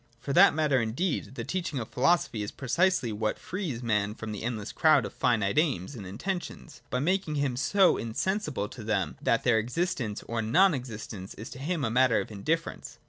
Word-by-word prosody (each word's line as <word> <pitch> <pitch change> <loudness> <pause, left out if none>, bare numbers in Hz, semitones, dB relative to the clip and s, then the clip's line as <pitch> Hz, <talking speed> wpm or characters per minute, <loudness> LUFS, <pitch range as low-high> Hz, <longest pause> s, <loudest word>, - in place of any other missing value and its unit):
For 140 +3 -4
that 185 0 +7
matter 150 -5 +2
indeed, 130 +6 -2
the - - -4
teaching 170 -6 -3
of 115 -3 -4
philosophy 130 -5 +2
is 105 - -3
precisely 140 0 +1
what 105 0 -1
frees 165 - -4
man 105 -2 0
from 110 -1 -6
the 105 - -5
endless 110 -3 -3
crowd 155 -3 +4
of - - -7
finite 115 +1 +2
aims 140 - 0
and 105 -7 -8
intentions, 170 - -5
by - - -1
making 165 +2 0
him 140 -3 0
so 180 +10 +3
insensible 135 - -2
to 120 -2 -9
them, 105 -3 -1
that - - +2
their 115 -2 +4
existence 120 - -2
or 115 0 -2
non 170 - +4
existence 115 -6 -6
is 110 - -9
to 130 - -9
him 155 0 -1
a 115 - -1
matter 125 -1 +4
of - - -5
indifference. 155 +11 -3
125 Hz, 195 wpm, -28 LUFS, 110-165 Hz, -, that